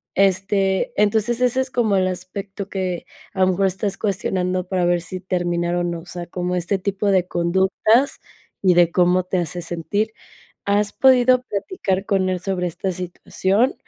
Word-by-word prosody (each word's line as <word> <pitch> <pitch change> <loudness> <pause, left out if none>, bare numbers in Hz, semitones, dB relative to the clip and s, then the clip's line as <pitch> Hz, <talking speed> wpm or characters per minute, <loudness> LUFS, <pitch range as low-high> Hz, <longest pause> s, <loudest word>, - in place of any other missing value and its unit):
este, 195 0 +2
entonces 220 +3 +2
ese 250 +1 +2
es 260 - -3
como 230 -6 +1
el 185 0 +2
aspecto 190 +2 -6
que, 185 -3 -3 0.3
a 190 - -2
lo 185 - +5
mejor, 195 +1 +2
estás 195 +1 -2
cuestionando 185 -2 -1
para 185 -1 0
ver 175 0 +2
si 185 +2 -6
terminar 175 -2 -1
o 175 - 0
no, 170 -1 -2
o 165 - -13
sea, 175 -1 -6
como 180 +1 -3
este 180 +3 -1
tipo 200 +2 -2
de 185 -2 +2
conductas 190 +9 +2 0.4
y 185 -2 +5
de 175 -1 +5
cómo 180 +1 +3
te 185 +1 -2
hace 175 +1 -3
sentir. 200 +6 -2 0.5
¿Has 205 0 +1
podido 255 -1 +5
platicar 200 - -2
con 190 -2 +1
él 185 -1 -2
sobre 185 -1 -1
esta 190 +3 -3
situación? 190 +6 0
190 Hz, 175 wpm, -21 LUFS, 180-200 Hz, 0.5 s, lo